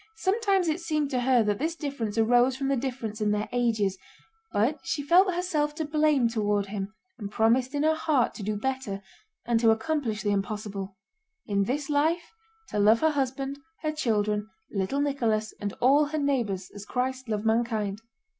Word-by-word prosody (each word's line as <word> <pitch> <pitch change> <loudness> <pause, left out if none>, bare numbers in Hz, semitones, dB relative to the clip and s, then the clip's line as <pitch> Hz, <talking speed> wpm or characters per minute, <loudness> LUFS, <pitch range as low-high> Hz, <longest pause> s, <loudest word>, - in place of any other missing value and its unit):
Sometimes 390 -3 +1
it 315 +2 0
seemed 305 -4 -1
to 250 -2 0
her 245 -2 +4
that 205 -1 0
this 320 +3 -1
difference 275 -9 -4
arose 245 +3 +4
from 275 0 -1
the 275 - +2
difference 240 -4 -4
in 210 - +2
their 210 0 0
ages, 220 -6 +1 0.5
but 255 +9 +1
she 335 -3 -2
felt 365 +6 +5
herself 305 -5 0
to 315 0 -2
blame 300 -4 +3
toward 210 -3 0
him 200 0 -5 0.3
and 205 -2 -5
promised 240 +6 +2
in 290 - +1
her 315 +1 +4
heart 305 -6 +1
to - - -8
do 210 +1 -2
better 220 -4 -3 0.4
and 235 -1 +2
to 230 -1 +4
accomplish 225 -2 0
the 205 - +1
impossible—in 200 - -4
this 275 +5 -2
life 315 +6 +1 0.4
to 210 - -2
love 215 +3 +5
her 315 0 +4
husband, 275 0 -2 0.2
her 310 - +1
children, 210 -7 0 0.2
little 200 +8 -1
Nicholas, 230 -7 0
and 205 -1 -2
all 280 +4 +5
her 305 +2 -3
neighbors, 235 -10 -1
as 205 - -8
Christ 255 +2 -3
loved 215 0 -2
mankind. 220 -3 0
245 Hz, 175 wpm, -27 LUFS, 210-295 Hz, 0.5 s, felt